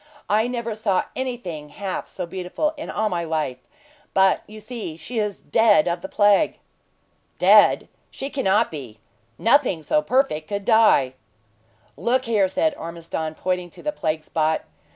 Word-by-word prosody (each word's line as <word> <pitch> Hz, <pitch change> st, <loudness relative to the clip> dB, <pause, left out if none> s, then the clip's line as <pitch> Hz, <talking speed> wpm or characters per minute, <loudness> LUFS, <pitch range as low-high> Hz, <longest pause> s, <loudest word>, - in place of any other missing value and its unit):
"I 215 Hz, +3 st, +3 dB
never 235 Hz, -2 st, -3 dB
saw 210 Hz, -3 st, +1 dB
anything 210 Hz, -, -5 dB
half 190 Hz, +4 st, -5 dB
so 180 Hz, -, -5 dB
beautiful 185 Hz, -, -2 dB
in 305 Hz, -, -7 dB
all 215 Hz, +1 st, 0 dB
my 175 Hz, -4 st, -1 dB
life; 155 Hz, -6 st, -2 dB, 0.6 s
but 190 Hz, 0 st, +4 dB
you 215 Hz, +1 st, -11 dB
see 215 Hz, -8 st, -6 dB
she 225 Hz, +9 st, -4 dB
is 210 Hz, -2 st, -3 dB
dead 210 Hz, -3 st, +4 dB
of 170 Hz, 0 st, -1 dB
the 190 Hz, -, -7 dB
plague." 205 Hz, +7 st, +3 dB, 0.8 s
"Dead? -, -, +6 dB, 0.2 s
she 275 Hz, +1 st, -6 dB
cannot 215 Hz, -8 st, +2 dB
be! 130 Hz, -8 st, -8 dB, 0.4 s
Nothing 230 Hz, -, +3 dB
so 300 Hz, -, +2 dB
perfect 255 Hz, -, 0 dB
could 200 Hz, -1 st, -4 dB
die!" 220 Hz, -, +4 dB, 0.8 s
"Look 255 Hz, +2 st, +1 dB
there," 215 Hz, -5 st, +2 dB
said 160 Hz, -3 st, +1 dB
Ormiston 165 Hz, -1 st, -5 dB
pointing 180 Hz, 0 st, -2 dB
to -, -, -15 dB
the 300 Hz, -, 0 dB
plague 160 Hz, -, -2 dB
spot. 155 Hz, 0 st, 0 dB
195 Hz, 150 wpm, -23 LUFS, 165-230 Hz, 0.8 s, Dead